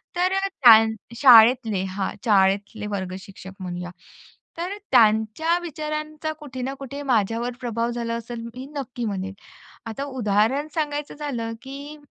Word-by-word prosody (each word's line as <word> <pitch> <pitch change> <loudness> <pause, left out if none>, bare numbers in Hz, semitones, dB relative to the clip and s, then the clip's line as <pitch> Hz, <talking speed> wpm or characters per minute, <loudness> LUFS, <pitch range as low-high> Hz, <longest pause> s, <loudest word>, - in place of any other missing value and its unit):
तर 360 +1 +2
अ, 390 0 +1
त्या 235 - +7 0.3
शाळेतले 230 -4 +6
हां, 190 0 -3
शाळेतले 205 +1 +2
वर्ग 190 -3 -4
शिक्षक 190 0 -11
म्हणूया. 180 -1 -5 0.7
तर 365 +4 -4
त्यांच्या 225 +8 +3
विचारांचा 305 -1 -4
कुठे 265 -4 -7
ना 265 +2 -3
कुठे 275 +1 -7
माझ्यावर 235 -1 0
प्रभाव 235 -1 -1
झाला 235 -1 -3
असेल, 235 0 -6
मी 255 +1 -8
नक्की 245 -3 -4
म्हणेन. 195 -2 -3 0.5
आता 225 +5 -4
उदाहरण 255 +2 +1
सांगायचं 295 -2 -3
झालं, 245 -7 -4
की 280 +3 -9
240 Hz, 135 wpm, -23 LUFS, 215-290 Hz, 0.7 s, त्या